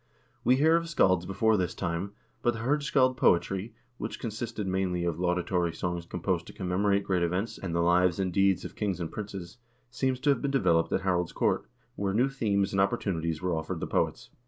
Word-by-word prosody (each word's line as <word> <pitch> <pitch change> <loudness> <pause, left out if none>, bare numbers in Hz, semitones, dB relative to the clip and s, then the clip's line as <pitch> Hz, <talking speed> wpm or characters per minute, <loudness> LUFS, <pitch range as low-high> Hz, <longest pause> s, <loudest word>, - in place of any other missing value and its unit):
We 125 - +5
hear 160 +5 +4
of 165 0 -3
scalds 95 - +3
before 110 +3 +2
this 90 -2 -1
time, 90 +2 -3 0.3
but 120 -1 +1
the 115 - -5
hirdscald 135 -1 +2
poetry, 95 +5 +1 0.2
which - - -5
consisted 110 -1 -4
mainly 95 -2 -1
of 85 -1 -2
laudatory 90 -1 0
songs 85 0 -3
composed 90 -1 -2
to - - -10
commemorate 100 +1 +1
great 95 -2 0
events 95 +6 -1
and 85 -3 -4
the 85 - +2
lives 85 0 +3
and 95 -2 -1
deeds 95 0 +2
of - - -8
kings 100 -5 -2
and 85 -2 -4
princes, 100 -2 -7 0.3
seems 130 0 0
to 145 - +4
have 135 - 0
been 140 - 0
developed 90 -12 +2
at - - +1
Harald's 90 -2 0
court, - - 0 0.3
where 100 -1 -1
new 125 +4 +3
themes 100 -7 0
and 95 - +2
opportunities 85 -4 -1
were 90 -1 0
offered 80 - -3
the - - -2
poets. - - -1
95 Hz, 200 wpm, -29 LUFS, 90-110 Hz, 0.3 s, We